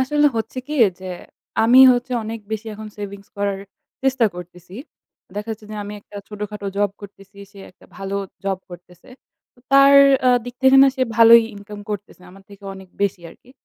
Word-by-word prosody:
আসলে 295 +3 +2
হচ্ছে 225 +3 -4
কি 295 - -7 0.3
যে 190 - -9 0.6
আমি 245 +3 +5
হচ্ছে 245 +1 -3
অনেক 225 +1 -6
বেশি 220 +1 -5
এখন 215 +1 -9
সেভিংস 200 -1 -8
করার 200 -1 -2 0.4
চেষ্টা 260 -3 +2
করতেছি। 180 +1 -12 0.6
দেখা 210 +2 -6
যাচ্ছে 215 0 -12
যে, 215 - -7
আমি 205 - -8
একটা 205 - -15
ছোটখাটো 210 -1 -7
জব 205 -1 +1
করতেছি, 200 0 -15 0.2
সে 200 - -15
একটা - - -24
ভালো 195 0 -5 0.3
জব 195 -1 -1
করতেছে। 175 0 -15 0.5
তো 245 - -25
তার 275 0 +7 0.3
আ - - +6 0.2
দিক 245 -1 -8
থেকে 265 0 +6
না 275 - +6
সে 260 - 0
ভালোই 230 0 +8
ইনকাম 205 +1 -11
করতেছে। 205 -3 -7
আমার 195 +1 -17
থেকে 200 0 -15
অনেক 190 -1 -13
বেশি 195 -3 -1
আরকি। 245 - -20
205 Hz, 180 wpm, -20 LUFS, 195-235 Hz, 0.6 s, ভালোই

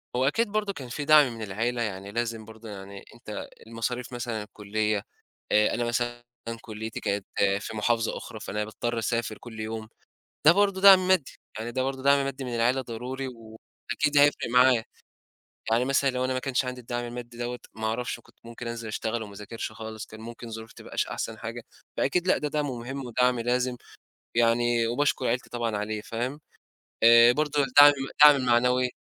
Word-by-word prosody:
هو 130 +1 +2
أكيد 230 +11 +2
برضو 210 -1 -1
كان 130 -7 -8
في 145 +4 -4
دعم 150 -4 +6
من 115 - -9
العيلة 115 +4 -2
يعني 100 -2 -4
لازم 115 -1 -3
برضو 110 +1 -12
يعني 100 -1 -9
أنت - - -7 0.2
المصاريف 115 +2 -4
مثلًا 120 -3 -3
الكلية، 105 0 -2 0.5
آآ 105 0 +4
أنا 120 - -1
مثلًا، 120 0 -1 0.4
كُليتي 110 0 -6
كانت 100 -1 -2 0.3
في 110 +1 -6
محافظة 115 +1 +1
أخرى 110 - -8
فأنا 105 +1 -3
باضطر 115 +2 -3
أسافر 115 -1 -2
كلّ 110 -2 -10
يوم، 110 0 -5 0.6
ده 155 - +10
برضو 200 +1 +2
دعم 190 -1 +8
مادي، 185 -7 +2 0.3
يعني 115 +2 -4
ده 130 +2 -1
برضو 135 0 -3
دعم 140 0 +4
مادي 135 0 -4
من 125 -2 -4
العيلة 125 +3 +2
ضروري 125 +3 -5
وأكيد 120 +4 -4
هيفرِق 145 +1 +4
معايا، 125 -1 +5 0.9
يعني 120 +2 +3
مثلًا 140 +1 +2
لو 130 0 -1
أنا 130 - -1
ما 130 - -1
كانش 130 0 -1
عندي 125 0 -5
الدعم 120 0 -4
المادي 120 0 -8
دوّة 120 0 -4
ما 110 0 -3
أعرفش 120 +3 -2
كُنت - - -22
ممكن 115 +1 -8
أنزل 115 -1 -5
أشتغل 110 +1 -2
وما 100 - -10
أذاكرش 105 +3 -6
خالص 110 0 -7
كان 110 - -12
ممكن 115 +1 -9
ظروفي 110 0 -8
ما - - -11
تبقاش - - -2
أحسن - - -4
حاجة، - - -6 0.3
فأكيد 175 +6 +1
لأ 185 - +4
ده 150 - -2
دعم 150 0 -1
مهم 130 +1 -5
ودعم 125 0 +2
لازم، 125 +1 0 0.6
يعني 120 0 +3
وباشكر 130 +2 0
عيلتي 120 +2 -1
طبعًا 115 -3 -2
عليه 105 +1 -3
فاهم، 125 +7 -4 0.6
آآ 115 +1 +8
برضو 150 +2 0
الدعم 145 +2 +8 0.3
الدعم 150 -1 +10
المعنوي 125 +1 +3
120 Hz, 180 wpm, -27 LUFS, 110-130 Hz, 0.9 s, ده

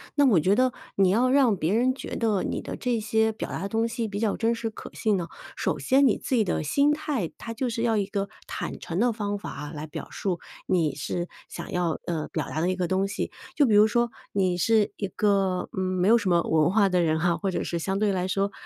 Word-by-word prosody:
那 290 -1 +5
我 225 -10 +5
觉 190 +5 +3
得 255 -1 +3 0.2
你 195 -1 +4
要 235 +7 +3
让 260 -6 +4
别 170 +2 0
人 255 +3 +2
觉 - - -6
得 215 -5 +1
你 - - -2
的 - - -6
这 245 -2 -1
些 220 +1 +1
表 220 - -6
达 - - -4
的 195 - -3
东 225 +2 +1
西 225 -1 -3
比 205 0 -4
较 220 -3 +1
真 230 0 +1
实 230 -1 -3
可 - - -10
信 215 -2 +1
呢， 170 -2 -3 0.3
首 - - -1
先 275 +2 +4
你 230 - +3
自 260 - -2
己 225 - +4
的 180 - -1
心 280 - +3
态， 295 - -2
它 230 - -6
就 245 +2 -2
是 230 0 -3
要 230 -1 +2
一 205 -2 +1
个 200 0 -2 0.2
坦 - - -5
诚 170 +2 -4
的 240 +1 +3
方 205 -2 -2
法 150 -7 -7
来 155 -1 -6
表 150 - -7
述。 180 -4 -2 0.3
你 165 -6 +1
是 175 +4 -3 0.2
想 - - -8
要， 175 -3 0
呃， 160 -3 -2
表 - - -3
达 155 - -3
的 175 +3 +1
一 185 - 0
个 180 -2 -2
东 190 +1 +1
西， - - -3 0.2
就 290 - +5
比 225 - +2
如 210 +1 +7
说 235 +1 +1 0.2
你 185 -3 +1
是 215 +3 +3
一 200 - -2
个， 195 -2 +1
嗯， - - -5
没 185 +1 +1
有 235 - +7
什 205 -5 -1
么 170 -1 +4
文 160 -1 +2
化 200 +1 +3
的 180 -1 +2
人 160 -2 +2
哈， 175 -1 +2
或 190 +4 -2
者 - - -2
是 170 - -2
相 190 +3 -1
对 210 -1 +2
来 185 -1 -1
说， 195 +1 0
200 Hz, 275 characters per minute, -26 LUFS, 180-230 Hz, 0.3 s, 如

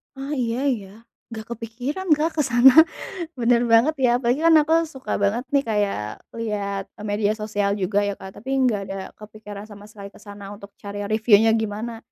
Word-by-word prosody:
Oh 275 +2 -5
iya 240 -3 -1 0.2
ya, 200 -4 -10 0.5
gak 220 0 -7
kepikiran 245 - -5
Kak, 315 +1 -1
ke 310 - +2
sana 245 0 +6 0.6
bener 240 -1 +2
banget 240 +8 +5
ya - - +5
apalagi 240 +3 +1
kan 330 - +6
aku 315 +2 +1 0.2
suka 265 0 -6
banget 205 +4 +1
nih 280 0 +3
kayak 205 -2 0 0.4
liat 200 -3 -3 0.3
media 205 0 +1
sosial 205 -2 -1
juga 200 0 -1
ya 200 - -2
Kak, 190 - -10
tapi 265 +5 -4
nggak 225 -5 +2
ada 195 - -6 0.2
kepikiran 210 -1 -10
sama 205 0 -13
sekali 200 -1 -11
ke - - -16
sana 205 -1 -10
untuk 200 0 -12
cari 205 0 -6
review-nya 220 0 +4
gimana, 220 +2 -4
215 Hz, 180 wpm, -23 LUFS, 205-245 Hz, 0.6 s, sana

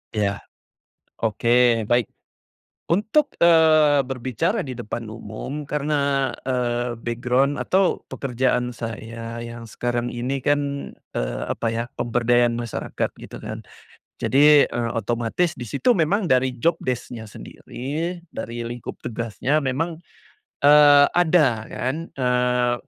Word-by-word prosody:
Iya, 100 -1 0 0.8
oke 110 +2 -1 0.4
baik. 120 -2 +1 0.8
Untuk, 220 - +2
eee, 155 -4 +5
berbicara 125 -2 -1
di 130 -3 -5
depan 115 -1 -5
umum 110 +7 -6
karena, 140 -2 0 0.2
eee, 120 -1 -1
background 125 +4 0
atau 190 0 +1
pekerjaan 125 -1 0
saya 115 +1 -6
yang 115 0 -8
sekarang 120 +1 -3
ini, 125 +2 -3
kan, 145 -1 -1 0.2
eee, - - -2
apa, - - -2
ya, 115 +1 -1
pemberdayaan 120 0 +2
masyarakat 120 -2 -3
gitu, - - -10
kan. - - -7 0.6
Jadi, 145 +1 +5
eee, 120 -1 -2
otomatis 120 - -1
di 125 - -7
situ 140 - +1
memang 185 +4 +1
dari 130 -1 +3
job 170 +4 +3
desc-nya 125 -2 -4
sendiri, 160 +7 -5
dari 120 -4 -6
lingkup 120 0 -7
tugasnya 120 +6 -1
memang, 160 +5 -2 0.6
eee, 145 -1 +8
ada, 175 -5 +4 0.2
kan, 135 +9 -3
eee, 125 -1 +2
125 Hz, 115 wpm, -23 LUFS, 120-145 Hz, 0.8 s, eee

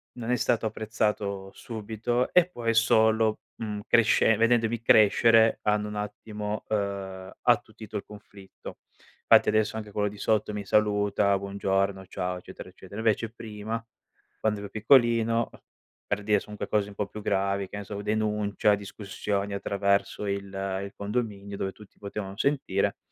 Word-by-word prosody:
non 120 -1 -5
è 125 - +3
stato 115 -2 +1
apprezzato 105 -3 -2
subito, 115 +2 -2
e 180 -1 +6
poi 115 -9 -2
solo, 110 -1 +4 0.2
mhmm, 105 -2 -4
cresce 115 -1 +4
vedendomi 115 0 +2
crescere 115 -1 +5
hanno 105 0 +1
un 105 - -6
attimo, 105 0 -5
ehm, 100 -2 -3
attutito 110 -1 0
il - - -5
conflitto. 100 -2 -12 0.5
Fatti - - +6
adesso 110 +1 +1
anche 105 -2 -6
quello 105 0 0
di 100 0 -12
sotto 105 -1 +1
mi 100 -1 -4
saluta, 105 -1 +2
buongiorno, 100 -1 -1
ciao, 90 0 -3
eccetera, 90 - -10
eccetera. 95 +3 -10
Invece 110 0 +1
prima, 110 0 -6 0.6
quando 105 -1 0
ero 100 -1 -7
piccolino 115 0 +3
a - - -16 0.5
per 100 0 -1
dire 105 -1 +2
son 105 - -11
unque - - -4
cose 100 0 -1
un 100 - -12
po' 105 -1 -2
più 105 +1 -9
gravi, 100 -1 0
che 100 - -7
ne 100 - -5
so, 105 - -7
u 100 - -5
denuncia, 105 -1 +1
discussioni 100 0 -4
attraverso 100 +1 0
il 100 0 -2 0.4
il 100 - -8
condominio, 100 -2 -3
dove 95 - -2
tutti 105 0 -17
potevano 100 -1 -6
sentire, 130 -9 0
105 Hz, 155 wpm, -27 LUFS, 100-110 Hz, 0.6 s, e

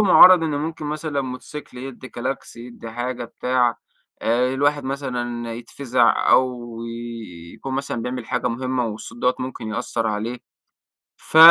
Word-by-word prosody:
مُعَرض 185 -3 +9
إن 160 - 0
ممكن 150 +1 -3
مثلًا 150 -1 -2
موتوسيكل 130 +1 -7
يدّي 130 0 -7
كلاكس، 130 +2 -4
يدّي 120 -1 -9
حاجة 120 +1 -3
بتاع، 120 0 +1 0.4
آآ 125 +3 +2
الواحد 145 +1 +2
مثلًا 120 -4 -3
يتفزع 120 0 +2
أو 125 -2 +3 0.9
يكون 135 -1 -5
مثلًا 135 -3 -2
بيعمل 125 -1 -4
حاجة 125 0 0
مهمّة 130 +1 -1
والصوت 110 +2 -7
دَوَّة 125 +1 +3
ممكن 125 -3 -5
يأثر 115 +1 -1
عليه. 110 +3 -2 0.8
فَ 160 - -1
125 Hz, 135 wpm, -23 LUFS, 120-135 Hz, 0.9 s, مُعَرض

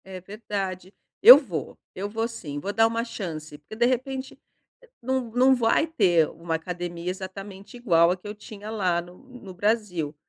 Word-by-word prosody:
É 190 -1 -8
verdade, 195 -2 -5 0.3
eu 250 +3 +12
vou 185 - -5 0.2
eu 200 +2 -5
vou 225 +2 -2
sim, 155 -11 -7
vou 195 +7 -4
dar 225 +2 +4
uma 230 0 -2
chance, 155 -10 -7
porque 150 +8 -12
de 235 +2 +2
repente 260 +2 -2 0.6
não 260 -1 -2
não 255 +3 +4
vai 235 +5 +2
ter 180 - +3
uma 165 -1 -4
academia 175 +1 -5
exatamente 195 +3 -8
igual 170 -8 +4
a 185 - -1
que 185 - -12
eu 205 - -5
tinha 210 0 -10
lá 185 -5 0
no 175 +1 -14
no 250 -8 -12
Brasil. 185 -6 -1
200 Hz, 175 wpm, -25 LUFS, 175-230 Hz, 0.6 s, eu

